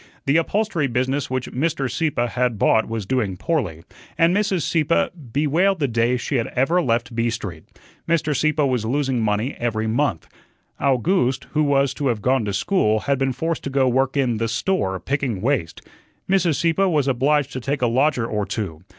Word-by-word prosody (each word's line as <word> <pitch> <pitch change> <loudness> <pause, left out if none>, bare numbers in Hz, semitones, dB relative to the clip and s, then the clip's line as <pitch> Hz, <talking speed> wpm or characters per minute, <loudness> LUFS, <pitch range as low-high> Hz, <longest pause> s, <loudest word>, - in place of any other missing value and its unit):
The 140 +3 +3
upholstery 175 -3 0
business 130 +2 -1
which 130 -1 -3
Mr. 140 0 -1
Sieppe 130 -2 0
had 125 -1 -1
bought 110 +2 +3
was 115 -3 -4
doing 105 -5 -1
poorly, 90 - -2 0.3
and 170 +2 +4
Mrs. 200 -5 +1
Sieppe 140 - +1 0.2
bewailed 160 - +2
the 145 - +1
day 120 +1 +1
she 130 +3 -2
had 115 - -1
ever 160 +8 +2
left 120 -3 -1
B 115 0 +1
Street. 100 -8 -6 0.4
Mr. 160 -3 +1
Sieppe 155 0 +1
was 130 -5 0
losing 130 +1 0
money 110 +5 0
every 110 -2 -1
month. 110 - -1 0.5
Owgooste, 135 +1 +1
who 155 - +1
was 140 -2 +2
to 145 - -2
have 115 -5 -1
gone 130 -3 +2
to 100 - -2
school, 110 - +1
had 140 -2 0
been 135 -1 +1
forced 160 +5 -3
to - - -2
go 135 0 +2
to 130 - +3
work 135 +2 +1
in 125 -5 +1
"the 115 +1 -1
store," 115 - -1
picking 130 -3 -2
waste. 115 - -1 0.5
Mrs. 185 -5 +2
Sieppe 170 +7 +2
was 150 -6 +1
obliged 140 +2 +1
to 130 - -3
take 135 +1 -2
a - - +5
lodger 125 +1 +2
or 105 -3 -2
two. 85 -7 -4
130 Hz, 190 wpm, -22 LUFS, 115-150 Hz, 0.5 s, a